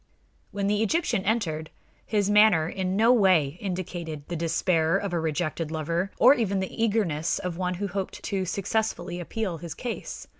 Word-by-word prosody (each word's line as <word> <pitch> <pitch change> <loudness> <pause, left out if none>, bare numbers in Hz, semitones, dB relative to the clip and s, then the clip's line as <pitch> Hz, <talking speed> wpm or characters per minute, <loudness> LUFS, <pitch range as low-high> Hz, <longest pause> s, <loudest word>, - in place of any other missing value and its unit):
When 200 -1 -3
the 205 +1 +1
Egyptian 225 - +1
entered, 160 -8 -1 0.4
his 205 -3 +1
manner 205 -6 +5
in 185 +1 -2
no 225 +4 +5
way 180 - +3
indicated 175 -5 -5
the 175 - -3
despair 165 +1 +1
of 200 -2 -4
a 170 - +1
rejected 160 0 -2
lover, 165 +4 -2
or 255 +4 +7
even 200 -7 0
the 190 +4 -3
eagerness 180 -8 +1
of 180 -2 -4
one 180 0 -2
who 200 +3 -3
hoped 195 0 -5
to 195 -1 -1
successfully 185 -1 -2
appeal 180 -1 -3
his 170 0 -7
case. 245 -2 -5
185 Hz, 165 wpm, -26 LUFS, 165-205 Hz, 0.4 s, or